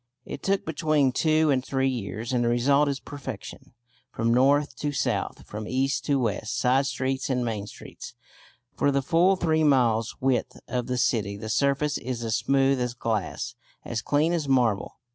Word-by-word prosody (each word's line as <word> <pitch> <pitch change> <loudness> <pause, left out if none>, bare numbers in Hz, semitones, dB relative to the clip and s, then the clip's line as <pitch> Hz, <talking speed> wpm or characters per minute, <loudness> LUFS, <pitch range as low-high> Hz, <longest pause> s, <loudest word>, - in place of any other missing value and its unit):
It - - -7
took 195 0 0
between 155 -3 +1
two 155 +2 +2
and 130 -2 +1
three 135 0 0
years, 115 -1 -4
and 120 -1 +2
the - - +1
result 140 +5 +3
is 140 -1 -2
perfection. 140 -4 -9 0.4
From 115 0 0
north 140 +4 +3
to 145 - -2
south, 140 - -2
from 105 0 -7
east 135 +2 0
to 140 -2 +2
west, 115 0 -2
side 135 +2 +2
streets 130 0 -2
and 125 -2 0
main 105 -3 -3
streets, - - -11 0.6
for 140 - +2
the 140 0 0
full 175 +7 +3
three 160 -3 +1
miles' 120 -6 +2
width 130 -2 0
of 125 0 -2
the 125 0 -1
city, 105 -5 0
the 110 +1 -7
surface 140 +5 +1
is 120 -1 -4
as 110 -2 0
smooth 135 +1 +2
as 125 0 -2
glass, 110 -6 -2 0.3
as 115 -1 -3
clean 155 +4 +1
as 160 -4 -1
marble. 120 -7 +1
130 Hz, 180 wpm, -26 LUFS, 120-145 Hz, 0.6 s, result